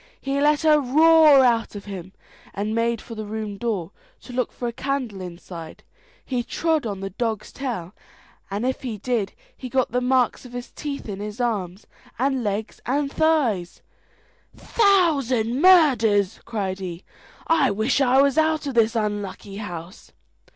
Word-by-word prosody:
He 275 +1 -1
let 300 +2 +3
a 305 -1 +6
roar 305 +1 +6
out 230 -3 +1
of 200 - -8
him, 190 -2 -7 0.4
and 210 +2 -2
made 230 0 0
for 230 - -10
the 215 -1 -6
room 215 -1 -4
door, 200 -7 -2 0.3
to 250 - -11
look 250 0 -1
for 245 - -5
a 235 - -4
candle 255 -7 -3
inside. 170 -2 -9 0.4
He 250 -2 -1
trod 315 +1 -1
on 200 -2 -5
the 195 0 -5
dog's 220 +1 -3
tail, 225 -10 -5 0.6
and 205 +4 -2
if 260 0 -1
he 240 -5 -4
did, 220 -2 -2 0.2
he 255 - -8
got 260 -1 0
the 250 +1 0
marks 250 -1 +1
of 250 -1 -12
his 245 0 -7
teeth 285 -4 -6
in 200 -2 -5
his 210 +2 -6
arms, 205 -6 -2 0.3
and 265 0 0
legs, 210 +1 -3
and 275 +2 0
thighs. 255 - +1 0.7
"Thousand 280 - +2
murders!" 230 - +5
cried 195 -4 -3
he; 180 -1 -6 0.4
"I 315 -5 +3
wish 220 +7 +1
I 265 +1 +5
was 280 +2 +2
out 315 -1 +1
of 275 - -3
this 230 0 +3
unlucky 205 -2 -3
house." 180 -2 -8
235 Hz, 165 wpm, -23 LUFS, 205-275 Hz, 0.7 s, a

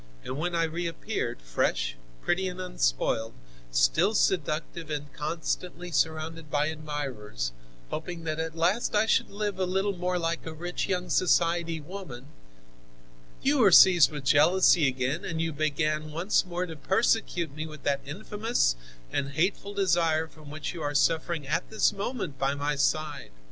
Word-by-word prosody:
And 130 - -5
when 175 +2 -1
I 165 - +2
reappeared, 165 - -3
fresh, - - 0 0.3
pretty 190 +2 +1
and 180 0 -6
unspoiled, 110 - 0 0.3
still - - +3
seductive 155 - 0
and 145 -1 -4
constantly 170 +3 -3
surrounded 160 0 -1
by 145 +1 +1
admirers, 135 - -4 0.4
hoping 165 +1 -5
that 155 -1 -2
at 160 0 -3
last 185 +8 +1
I 210 +1 +4
should 220 - +2
live 205 -1 -3
a 185 - +2
little 195 +2 0
more 180 0 -1
like 170 -1 -1
a 160 - -5
rich 175 +3 -3
young 180 -2 -1
society 170 -2 +2
woman, 150 -6 -8 1.2
you 280 +1 +3
were 205 -6 +6
seized 175 -2 +8
with 145 -2 -6
jealousy 155 +2 +5
again, 130 +4 -1
and 165 -1 -3
you 165 -1 -1
began 155 +1 0
once 180 +4 +1
more 180 +1 -2
to 165 -3 -8
persecute 180 -2 +1
me 155 +2 -5
with 155 -2 -11
that 140 -1 +1
infamous 210 - 0 0.4
and 140 0 -2
hateful 195 +5 -1
desire 170 -5 +2
from 155 -2 -14
which 155 +3 -5
you 170 - -7
are 145 -1 -2
suffering 160 0 +1
at 165 +5 -1
this 220 -1 +2
moment 200 - -4
by 135 +1 +1
my 145 +1 -1
side. 150 - -1
160 Hz, 160 wpm, -28 LUFS, 145-180 Hz, 1.2 s, seized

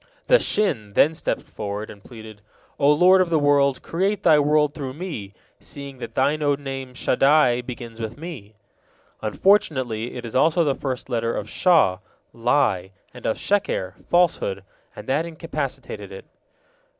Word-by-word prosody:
The - - +5
Shin 115 - -1
then 155 +9 +4
stepped 160 - -3
forward, 105 0 -6
and 100 -1 -15
pleaded: 110 -3 -12 0.4
"O 145 0 +5
Lord 180 +5 +6
of 180 - +1
the 165 - +2
world, 140 -2 +2
create 195 +4 -1
Thy 150 - +6
world 150 0 +2
through 135 -4 -6
me: 145 - -6 0.2
seeing 140 -2 -9
that - - -8
Thine 155 +2 +1
own 145 -1 0
name 135 -2 -6
Shaddai 130 -1 +3
begins 120 -2 -8
with 115 +1 -5
me." 145 - -9 0.7
Unfortunately, 125 - +1
it 120 -1 -6
is 115 - -7
also 160 +6 +3
the 145 -3 +1
first 130 -2 -4
letter 115 -2 -1
of 105 - -4
Shaw, 155 - +3 0.3
lie, 115 -6 +1 0.2
and 125 - -6
of 110 - 0
Sheker, 140 - -1 0.2
falsehood, 160 - +1 0.3
and - - -9
that 140 +4 +1
incapacitated 160 -2 -6
it. 475 - -10
135 Hz, 155 wpm, -23 LUFS, 115-155 Hz, 0.7 s, Lord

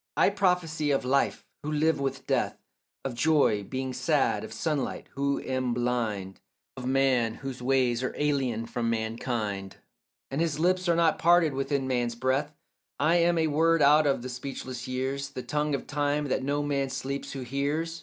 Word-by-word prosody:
I - - +5
prophesy 180 -6 +1
of 135 -2 +1
life, 135 +2 +1 0.2
who 150 - -4
live 155 0 +2
with 135 -1 -3
death; - - 0 0.5
Of 135 - -2
joy, 140 -5 +3
being 130 +5 -4
sad; - - +1
of - - -8
sunlight, 150 -5 -2
who 140 0 0
am 130 -2 -1
blind; 115 -6 -2 0.4
Of 125 -1 -5
man, 130 -4 +2
whose 135 -2 -7
ways 125 -2 +2
are 130 - -1
alien 135 -6 0
from 115 0 -2
mankind 110 -3 -3 0.5
And 140 +4 -1
his 160 -3 0
lips 180 +1 +2
are 170 - +4
not 165 -1 +3
parted 170 -3 +4
with 135 0 -2
man's 130 -4 0
breath; 130 +4 0 0.5
I 160 +4 +4
am 170 0 +3
a 160 - +3
word 160 +1 +3
out 150 +1 +6
of 135 -3 +1
the 130 - -5
speechless 125 0 -6
years, 135 +2 -2
The 130 -2 -6
tongue 150 -1 0
of - - -5
time, 145 0 -1
that 130 - 0
no 145 +2 0
man 140 -2 0
sleeps 135 +1 -4
who 135 - -5
hears. 145 +6 -2
135 Hz, 175 wpm, -28 LUFS, 125-150 Hz, 0.5 s, out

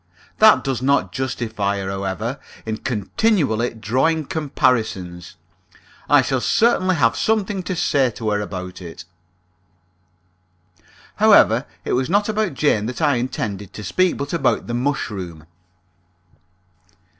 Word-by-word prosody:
That 215 0 +6
does 135 -3 -2
not 130 -9 +1
justify 110 -4 -2
her, 95 -1 -4
however, 100 +7 -3 0.3
in 110 -1 -3
continually 120 - 0
drawing 135 +9 0
comparisons. 110 - -1 0.7
I - - +6
shall - - -1
certainly 190 -5 +2
have 115 -7 +2
something 210 -3 0
to 185 0 -4
say 140 -5 +2
to 110 -2 -3
her 105 0 0
about 90 -2 -6
it. 85 0 -9 2.1
However, - - +5 0.2
it - - -1
was 130 +1 0
not 205 +3 +2
about 215 -7 -1
Jane 110 -8 +1
that 125 - -5
I 145 -5 +2
intended 105 -5 -4
to 105 - -8
speak, 185 - +1
but 140 +2 -5
about 150 -6 +1
the 120 - -5
mushroom. 100 - -3
125 Hz, 125 wpm, -21 LUFS, 105-155 Hz, 2.1 s, That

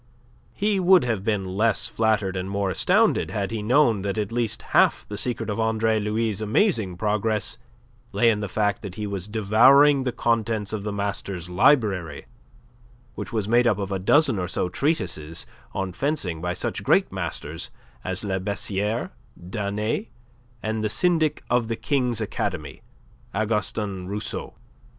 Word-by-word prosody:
He 205 -1 +1
would 185 -2 +5
have 115 -6 -1
been 105 -3 0
less 105 +4 +1
flattered 110 -4 0
and 95 +1 -3
more 100 -1 -1
astounded - - +2
had 100 0 -3
he 110 -2 -3
known 115 -2 +3
that 100 +1 -3
at 105 -1 -2
least 115 -2 -1
half - - +3
the 105 - -6
secret 115 0 -1
of 105 0 -3
Andre 110 0 +1
Louis' 105 0 -1
amazing 110 - +1
progress 105 +2 0 0.5
lay 115 +3 +4
in 105 - -1
the 105 - -3
fact 105 +1 0
that 100 -4 -7
he 105 - -4
was 100 -2 -4
devouring 120 +7 +5
the 130 -1 -1
contents 115 -3 -1
of 110 - -2
the 105 +1 -4
master's 100 -3 -4
library, 95 - +2 0.9
which - - -7
was 110 -3 -1
made 120 +2 +4
up 105 -4 +2
of 100 -1 -4
a 95 - -1
dozen 130 +3 +3
or 90 - -2
so 90 0 -1
treatises 90 - -1 0.3
on 95 -2 -3
fencing 95 - -2
by 90 +1 -2
such - - -3
great - - +3
masters 80 +3 -4 0.3
as 95 +2 -2
La 95 -2 -1
Bessiere, 100 +3 -2 0.3
Danet, 105 - -3 0.6
and 110 0 -2
the 110 - 0
syndic 160 - +2
of 120 -1 +1
the 115 - -2
King's 125 -3 0
Academy, - - -4 0.5
Augustin 105 -3 -1
Rousseau. 105 +2 -4
105 Hz, 160 wpm, -24 LUFS, 95-115 Hz, 0.9 s, would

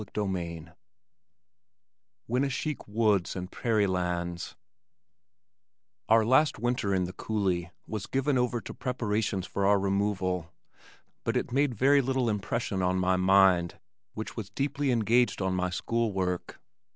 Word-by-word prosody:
CHAPTER 105 +1 -3
VII 85 -4 -4 1.6
Winnesheik 135 +4 -1
"Woods 105 -3 +1
and 90 0 -5
Prairie 110 -3 +1
Lands" 90 -3 -2 1.5
Our 110 0 +5
last 130 +6 +4
winter 120 -3 -1
in 95 -1 +2
the 90 +1 -5
Coulee 95 -6 -1 0.2
was 105 -3 -5
given 135 +1 0
over 125 -2 0
to - - -8
preparations 110 -6 -2
for 100 - -3
our 100 0 +5
removal 95 -3 -1 0.7
but - - 0
it - - -2
made 135 -1 +1
very 140 +5 +4
little 130 -2 0
impression 105 -1 -2
on 90 0 +1
my 95 0 +2
mind 95 -2 +4 0.4
which 110 - -6
was 110 -4 -5
deeply 140 +4 -1
engaged 120 +1 +2
on 95 -1 0
my 90 0 0
school 115 +5 -1
work. 90 -2 -3
105 Hz, 135 wpm, -28 LUFS, 95-120 Hz, 1.6 s, Our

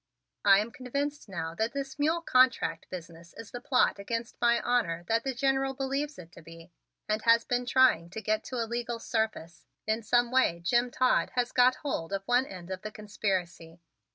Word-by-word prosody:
"I 195 -1 +7
am 215 +3 -1
convinced 280 +2 -4
now 165 -3 -4
that 220 +6 -2
this 280 +2 -5
mule 320 +3 +1
contract 255 -4 +2
business 170 -1 -10
is 225 - -10
the 245 - -7
plot 250 -5 +2
against 230 +3 -4
my 235 0 +4
honor 190 -9 0
that 225 +1 +1
the 270 -2 -3
General 270 +1 0
believes 275 +2 -2
it 170 -1 -12
to 170 - -14
be 165 +1 -14 0.4
and 215 +1 0
has 230 0 +4
been 245 0 -1
trying 245 -10 +4
to 195 - -6
get 215 0 -1
to 255 - -6
a 235 -2 0
legal 235 +1 -3
surface. 220 -8 -3 0.2
In 220 +1 0
some 240 +2 +2
way 255 -10 +2
Jim 240 +7 +2
Todd 255 +1 +1
has 245 -1 0
got 250 +1 +4
hold 200 - -4
of 195 0 -2
one 250 +4 +2
end 185 -1 -9
of 185 0 -5
the 215 - -5
conspiracy. 185 -6 -4
230 Hz, 195 wpm, -29 LUFS, 190-255 Hz, 0.4 s, I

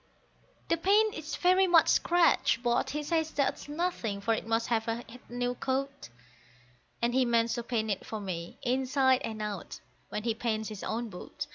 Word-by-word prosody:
The 335 - +3
paint 415 +5 +3
is 315 0 -5
very 370 +1 +4
much 340 -2 +6
scratched, 340 -8 +3
but 240 -1 +1
he 300 +1 -3
says 320 0 0
that's 290 -1 -1
nothing, 295 - -2
for 225 +3 +1
it 220 - -3
must 225 +1 0
have 225 -2 +1
had 235 +1 -5
a - - -16
new 245 0 -1
coat; 265 - -3 0.9
And 240 0 +2
he 260 0 +4
means 235 -1 +2
to 240 - -2
paint 225 -2 -1
it 195 - -2
for 220 - -5
me, 175 -4 -5
inside 260 +1 +2
and 215 -1 -4
out, 205 -3 -5 0.3
when 210 - -4
he 230 -1 +1
paints 220 -1 -2
his 210 -3 -8
own 230 +1 -2
boat. 180 - -7
240 Hz, 185 wpm, -30 LUFS, 220-295 Hz, 0.9 s, much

